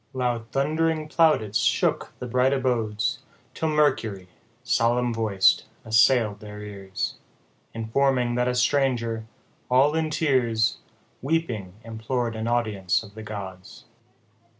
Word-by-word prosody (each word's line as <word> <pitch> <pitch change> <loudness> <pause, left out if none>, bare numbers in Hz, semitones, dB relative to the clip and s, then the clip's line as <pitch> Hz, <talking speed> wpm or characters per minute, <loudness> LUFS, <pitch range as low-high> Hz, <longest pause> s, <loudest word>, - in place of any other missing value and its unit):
85 - - -4
Loud 120 -2 -2
thund'ring 155 +3 0
plaudits 130 -11 +2
shook 115 +1 +1
the - - -6
bright 125 +2 +2
abodes, 115 -6 0 0.3
Till 160 - -1
Mercury, 130 -11 +1 0.4
solemn 120 +1 +1
voic'd, 110 -4 +3 0.2
assail'd 110 -1 +3
their 105 -1 -9
ears, 105 0 -5 0.6
Informing, 125 +2 +1
that 125 +1 +1
a 125 - 0
stranger, 125 -4 +1 0.4
all 135 +4 +4
in 160 -1 0
tears, 120 -7 +1 0.4
Weeping, 125 - -2
implor'd 115 +1 -3
an 110 +1 -3
audience 110 -6 0
of 100 -2 -13
the 110 - -9
gods. 95 -4 -8
115 Hz, 120 wpm, -25 LUFS, 110-130 Hz, 0.6 s, all